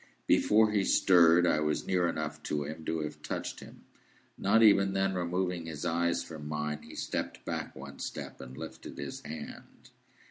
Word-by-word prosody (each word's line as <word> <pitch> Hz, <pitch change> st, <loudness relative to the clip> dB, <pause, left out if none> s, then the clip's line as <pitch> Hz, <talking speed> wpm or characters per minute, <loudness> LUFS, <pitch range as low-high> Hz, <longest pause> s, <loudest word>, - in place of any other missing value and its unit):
Before 110 Hz, 0 st, +4 dB
he 100 Hz, -2 st, +2 dB
stirred, 85 Hz, -3 st, +5 dB
I 75 Hz, -, +3 dB
was 75 Hz, 0 st, 0 dB
near 90 Hz, -2 st, +2 dB
enough 80 Hz, -2 st, -3 dB
to 75 Hz, -1 st, 0 dB
him 80 Hz, +2 st, -7 dB
to 80 Hz, -1 st, -1 dB
have 75 Hz, -, -6 dB
touched -, -, -4 dB
him. -, -, -13 dB, 0.5 s
Not 110 Hz, +3 st, +3 dB
even 100 Hz, -2 st, +5 dB
then 95 Hz, 0 st, +1 dB
removing 90 Hz, -1 st, -1 dB
his 75 Hz, -3 st, -5 dB
eyes 85 Hz, +1 st, +1 dB
from 75 Hz, -2 st, -8 dB
mine, 75 Hz, 0 st, -3 dB
he -, -, -12 dB
stepped -, -, -4 dB
back -, -, -4 dB
one 70 Hz, +1 st, -10 dB
step, -, -, -6 dB
and 65 Hz, -, -10 dB
lifted -, -, -8 dB
his 70 Hz, -1 st, -6 dB
hand. 80 Hz, +1 st, -9 dB
85 Hz, 175 wpm, -31 LUFS, 75-95 Hz, 0.5 s, stirred